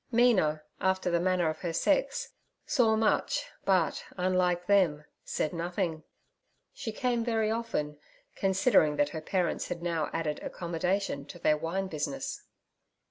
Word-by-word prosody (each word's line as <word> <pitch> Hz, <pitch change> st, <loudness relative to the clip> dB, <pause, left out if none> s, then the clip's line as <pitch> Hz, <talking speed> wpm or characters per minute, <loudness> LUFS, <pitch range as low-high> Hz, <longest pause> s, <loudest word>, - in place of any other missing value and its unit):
Mina, 200 Hz, -11 st, +3 dB, 0.2 s
after 190 Hz, -1 st, +1 dB
the 170 Hz, -, +3 dB
manner 180 Hz, -1 st, +2 dB
of 155 Hz, 0 st, -2 dB
her 170 Hz, -2 st, -3 dB
sex, -, -, +1 dB, 0.4 s
saw 230 Hz, -6 st, +3 dB
much, 220 Hz, -, +1 dB, 0.2 s
but, 185 Hz, -4 st, +2 dB
unlike 180 Hz, -1 st, +1 dB
them, 175 Hz, -7 st, +3 dB, 0.2 s
said 155 Hz, -, -2 dB
nothing. 170 Hz, -1 st, -2 dB, 0.7 s
She 225 Hz, -, -5 dB
came 240 Hz, +1 st, 0 dB
very 225 Hz, -2 st, +1 dB
often, 185 Hz, -11 st, -2 dB, 0.3 s
considering 190 Hz, -5 st, +3 dB
that 145 Hz, 0 st, +2 dB
her 160 Hz, +1 st, -5 dB
parents 180 Hz, +2 st, -1 dB
had 170 Hz, -1 st, -5 dB
now 165 Hz, -3 st, -1 dB
added 155 Hz, -2 st, -2 dB
'accommodation' 175 Hz, -3 st, -2 dB
to -, -, -9 dB
their 155 Hz, -2 st, +3 dB
wine 165 Hz, +5 st, -2 dB
business. 150 Hz, -6 st, -4 dB
180 Hz, 135 wpm, -30 LUFS, 160-210 Hz, 0.7 s, Mina